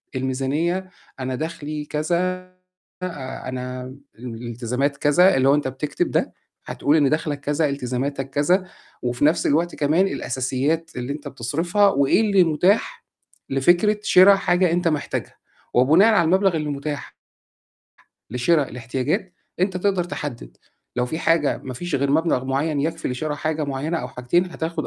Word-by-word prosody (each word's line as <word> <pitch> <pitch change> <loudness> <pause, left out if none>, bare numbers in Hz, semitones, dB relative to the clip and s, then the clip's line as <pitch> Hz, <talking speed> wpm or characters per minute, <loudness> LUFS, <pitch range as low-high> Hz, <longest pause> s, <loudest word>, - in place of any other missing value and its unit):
الميزانية 140 +8 -1 0.3
أنا 130 0 -3
دخلي 150 -1 -5
كذا 155 +3 -1 0.9
آآ 135 -7 -6
أنا 125 0 -5
م 130 +1 -9 0.2
ال 125 - -10
الالتزامات 125 +4 -2
كذا، 175 +7 +4
اللي 135 +1 +3
هو 140 - +6
أنت 145 -3 -1
بتكتب 145 +3 -2
ده - - 0 0.3
هتقول 145 +3 +1
إن 145 -3 +3
دَخْلك 150 -1 -1
كذا، 145 +1 0
التزاماتك 135 +1 -3
كذا 180 +7 +2 0.4
وفي 120 +3 0
نَفْس 155 +3 +2
الوقت 170 +4 +1
كمان 155 +6 +2
الأساسيات 140 +3 -2
اللي 125 +3 -3
أنت 145 0 -8
بتصرفها 165 - +1
وإيه 140 +5 +3
اللي 200 -4 +4
متاح 180 +7 +1 0.4
لفكرة 175 +10 +3
شِرا 195 0 +7
حاجة 180 -2 +2
أنت 175 0 +1
محتاجها 150 -2 -3 0.4
وبناءً 160 - +5
على 170 - +4
المبلغ 190 +1 +3
اللي 150 -1 -3
متاح 145 0 -5 1.2
لشرا 140 +6 +2
الاحتياجات، 125 +9 -3 0.3
أنت 185 0 +1
تقدر 190 -1 +1
تحدِّد 145 -8 -6 0.4
لو 125 0 +1
في 160 +6 -4
حاجة 165 -3 +2
ما 130 -1 -6
فيش 175 +8 -5
غير 140 0 +1
مبلغ 155 -3 +1
معيّن 140 +3 0
يكفي 160 +2 -2
لشِرا 145 +4 -3
حاجة 155 +1 -2
معيّنة 145 +4 -2
أو - - -5
حاجتين، 175 +9 0
هتاخُد 165 0 -4
150 Hz, 150 wpm, -22 LUFS, 135-170 Hz, 1.2 s, شِرا